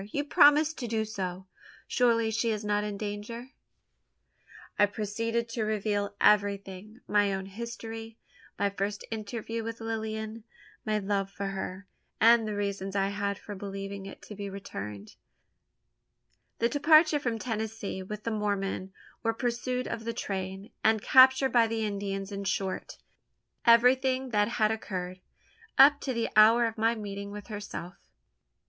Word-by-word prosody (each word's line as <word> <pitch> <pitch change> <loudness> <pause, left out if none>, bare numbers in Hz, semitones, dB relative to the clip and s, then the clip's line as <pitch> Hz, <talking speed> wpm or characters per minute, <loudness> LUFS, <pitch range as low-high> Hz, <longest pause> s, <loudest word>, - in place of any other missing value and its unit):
You 285 - -1
promised 295 +2 +5
to 240 - -3
do 220 -1 0
so? 190 -3 -5 0.4
Surely 230 -2 +2
she 230 +1 0
is 215 -1 -2
not 205 0 +1
in 210 -1 -4
danger?" 215 +5 -6 1.3
I 205 - +6
proceeded 230 +3 -2
to 230 -1 -2
reveal 205 -1 -1
everything 205 +1 +1
my 205 -1 +3
own 190 0 -3
history 225 +1 -7 0.4
my 200 0 +1
first 200 +1 -3
interview 225 +1 -4
with 230 0 -5
Lilian 220 0 -4 0.4
my 215 0 +2
love 200 -1 -1
for 195 0 -4
her, 195 0 -5 0.3
and 230 0 +6
the 210 - -3
reasons 200 -1 -3
I 195 0 +2
had 200 0 -2
for 205 - -9
believing 195 0 -6
it - - -11
to - - -9
be 200 -1 -6
returned 105 - -8 1.4
the 230 - +2
departure 310 +3 +5
from 240 -5 -2
Tennessee 220 -4 -4
with 210 +3 -7
the 230 - -2
Mormon 200 -3 -2 0.3
our 225 -1 +1
pursuit 250 +1 -2
of 230 -1 -4
the 230 +1 -3
train, 190 0 -5
and 220 0 +4
capture 260 +3 +6
by 235 -3 +4
the 225 -1 -1
Indians 200 -1 -3
in 200 0 -5
short, 190 0 -2 0.7
everything 255 +2 +4
that 205 -3 +2
had 220 -2 +1
occurred, 185 -4 -4 0.6
up 285 +2 +7
to 270 - -2
the 230 -2 -1
hour 225 +3 +7
of 225 -1 -2
my 225 +1 +3
meeting 200 -2 -6
with 205 +2 -9
herself. 205 -4 -6
215 Hz, 150 wpm, -29 LUFS, 200-230 Hz, 1.4 s, up